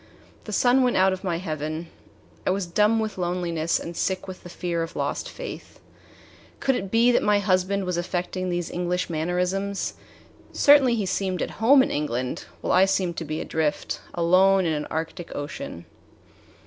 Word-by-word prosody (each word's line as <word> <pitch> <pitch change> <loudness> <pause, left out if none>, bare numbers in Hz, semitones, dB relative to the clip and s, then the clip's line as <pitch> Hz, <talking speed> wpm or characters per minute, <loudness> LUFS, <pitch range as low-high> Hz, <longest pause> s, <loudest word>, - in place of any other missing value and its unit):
The 215 - -6
sun 245 +5 +4
went 250 -1 +2
out 190 0 +4
of 190 - -6
my 175 -3 -1
heaven. 155 -1 -4 0.6
I - - 0
was 190 0 0
dumb 210 +6 +2
with 215 -3 -3
loneliness 175 -2 0
and 170 +1 -7
sick 185 +2 -1
with 185 -1 -8
the 175 - -11
fear 175 -1 -2
of 165 - -5
lost - - -2
faith. - - -8 0.8
Could 270 - +2
it 195 -6 -3
be 230 +4 +4
that 245 - +3
my 210 0 +3
husband 195 0 +1
was 180 -1 -1
affecting 180 +1 -2
these 175 -1 -2
English 180 0 -2
mannerisms? 180 +5 -1 0.6
Certainly 280 -4 +6
he 210 -4 -1
seemed 185 -1 -1
at - - -4
home 265 +4 +7
in - - -2
England, 130 -4 -2 0.2
while - - 0
I 185 - +6
seemed 190 -3 0
to 165 - -3
be 155 +1 -3
adrift, 155 -2 -2
alone 185 +3 +4
in 160 - +1
an 150 -1 -3
arctic 165 +2 -5
ocean. 145 - -6
180 Hz, 175 wpm, -25 LUFS, 170-200 Hz, 0.8 s, home